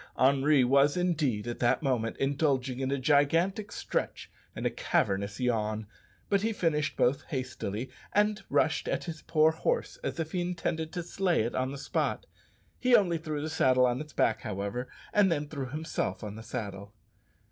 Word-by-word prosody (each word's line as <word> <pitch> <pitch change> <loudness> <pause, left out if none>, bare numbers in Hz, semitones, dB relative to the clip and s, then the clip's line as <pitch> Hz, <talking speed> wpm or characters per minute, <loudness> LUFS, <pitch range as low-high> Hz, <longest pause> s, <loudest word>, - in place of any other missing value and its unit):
Henri 140 +1 +4
was 140 +5 +4
indeed, 150 -12 0
at 120 - -4
that 120 +5 +2
moment, 120 -5 0
indulging 135 -2 0
in 135 0 -1
a 140 - 0
gigantic 165 +9 +2
stretch - - -3 0.2
and - - -4
a - - +2
cavernous 100 +1 0
yawn; 110 -3 0 0.4
but 200 -1 +2
he 225 +2 +1
finished 155 -6 0
both 130 +3 +2
hastily, 130 - -4 0.2
and 210 0 +2
rushed 160 0 +1
at - - -1
his 160 -2 -6
poor 155 0 +3
horse 485 - -1
as - - -3
if 160 -1 -2
he 180 - -1
intended 165 -2 -2
to 175 -1 -4
slay 180 - +1
it 120 - -3
on 130 +1 -1
the 140 - -6
spot. - - -1 0.5
He 250 -1 +5
only 175 -7 +3
threw 155 -2 -4
the - - -2
saddle 130 -5 +4
on 125 +2 0
its 150 0 -9
back, 115 -4 +1
however, 105 +4 -3 0.3
and 200 -3 +4
then 150 -2 0
threw 140 -3 -5
himself 155 -3 -3
on 105 -1 -6
the 110 - -8
saddle. 100 -2 -6
140 Hz, 180 wpm, -29 LUFS, 125-165 Hz, 0.5 s, He